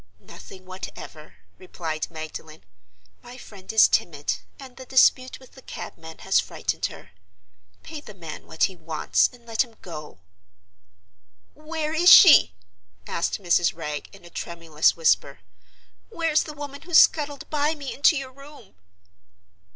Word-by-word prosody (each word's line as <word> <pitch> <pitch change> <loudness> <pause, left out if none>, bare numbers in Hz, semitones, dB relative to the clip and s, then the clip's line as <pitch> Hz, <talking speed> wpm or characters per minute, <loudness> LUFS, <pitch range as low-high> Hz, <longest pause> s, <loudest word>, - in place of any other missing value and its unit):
"Nothing 185 -1 -13
whatever," 185 -4 -10 0.2
replied 160 -4 -5
Magdalen. 155 0 -9 0.6
"My 245 +1 -12
friend 200 -6 -11
is 220 -1 +6
timid; 145 -4 -1 0.2
and 260 -2 -12
the 260 - -10
dispute 255 0 +3
with 260 - -18
the 265 - -16
cabman 160 -8 -10
has - - +3
frightened - - -3
her. 95 - -14 0.7
Pay 310 -2 -9
the 210 -8 -13
man 165 -5 -10
what 160 - -3
he 190 - +1
wants, 160 -2 0
and 245 -2 -19
let 225 +1 +1
him 230 -3 -19
go." 150 - -9 1.4
"Where 310 0 -5
is 340 +2 +5
She?" 310 - +8 0.5
asked 170 - -2
Mrs. 175 -2 +1
Wragge, 150 -3 -6
in 195 -3 -16
a 175 - -14
tremulous 165 -3 0
whisper. 150 -4 +1 0.7
"Where's 325 -2 +1
the 305 - -7
woman 285 -1 -8
who 350 0 -4
scuttled 290 -3 +4
by 300 +1 0
me 280 -3 -7
into 285 +2 +3
your 265 -1 -6
room?" 275 - -16
220 Hz, 145 wpm, -24 LUFS, -, 1.4 s, She